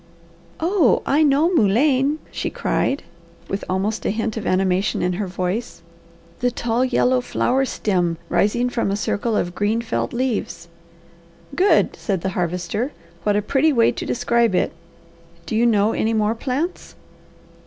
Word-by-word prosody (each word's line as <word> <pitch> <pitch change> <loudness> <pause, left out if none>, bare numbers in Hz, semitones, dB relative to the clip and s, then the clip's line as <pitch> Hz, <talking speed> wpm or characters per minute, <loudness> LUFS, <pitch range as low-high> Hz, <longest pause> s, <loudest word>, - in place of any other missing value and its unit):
"Oh 335 - +2
I 285 +3 +2
know 305 +4 +3
mullein," 270 - +3
she - - -3
cried, 275 - -1 0.4
with 195 - -3
almost 195 +4 -1
a - - 0
hint 220 +1 -2
of 220 - -4
animation 190 +1 +1
in 180 0 +1
her 195 +2 -3
voice. 180 +1 -3 0.6
"The 245 - +2
tall, 235 0 -1
yellow 255 0 +2
flower 265 +2 0
stem 180 -9 -1
rising 240 +4 +1
from 240 -4 -1
a 200 - 0
circle 215 +1 -1
of 175 - -1
green 210 +4 0
felt 235 -1 -2
leaves!" 240 -8 -3 0.9
"Good!" 380 +5 +3
said 195 -5 -2
the 190 - -1
Harvester. 180 - -2 0.3
"What 205 -1 +1
a 205 - +1
pretty 280 +8 +2
way 235 -5 +4
to - - -6
describe 235 -3 +1
it! - - +1 0.7
Do - - -3
you 235 +2 +3
know 215 -1 +3
any 225 +1 0
more 215 0 +2
plants?" 275 +9 -3
225 Hz, 155 wpm, -21 LUFS, 195-255 Hz, 0.9 s, way